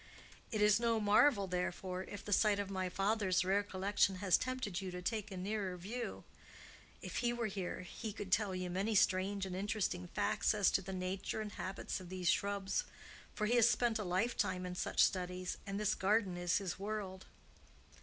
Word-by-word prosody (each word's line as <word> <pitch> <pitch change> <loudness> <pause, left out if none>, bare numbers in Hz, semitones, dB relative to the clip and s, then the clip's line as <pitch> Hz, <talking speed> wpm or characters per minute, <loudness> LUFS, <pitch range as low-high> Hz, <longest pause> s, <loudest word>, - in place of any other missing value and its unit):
"It 215 -2 +1
is 210 +1 +5
no 230 -1 +2
marvel, 210 +1 +4
therefore, 180 0 -2
if 205 - -8
the 205 - 0
sight 210 0 +4
of 200 -1 -3
my 185 -1 -1
father's 195 -1 +1
rare 195 +2 +3
collection 200 0 +1
has 185 -1 +3
tempted 255 -8 -2
you 190 - -4
to 180 0 -5
take 215 +3 -2
a 190 - -7
nearer 190 -1 -2
view. 230 +7 -5 0.8
If - - -5
he 240 -1 +1
were 240 -1 -2
here, 190 -4 -3
he 215 +4 -6
could 200 -2 -7
tell 200 -2 +2
you 185 -1 -3
many 200 +4 0
strange 195 +1 +2
and 185 -1 -5
interesting 190 -2 -1
facts 205 +3 +1
as 205 -2 +4
to - - +2
the 190 +1 -7
nature 185 +3 -3
and 215 -1 -4
habits 190 +1 -4
of 180 -2 -10
these 185 -1 -1
shrubs; 200 -1 0 0.5
for 215 - 0
he 240 +3 +3
has 235 0 +6
spent 235 -2 +2
a - - -1
lifetime 185 -1 0
in 180 - -4
such 180 - +2
studies, 180 -1 -1
and 200 +1 -2
this 210 0 +2
garden 200 -1 +1
is 175 -1 +1
his 190 -2 -3
world." 200 -2 -4
195 Hz, 195 wpm, -36 LUFS, 185-210 Hz, 0.8 s, has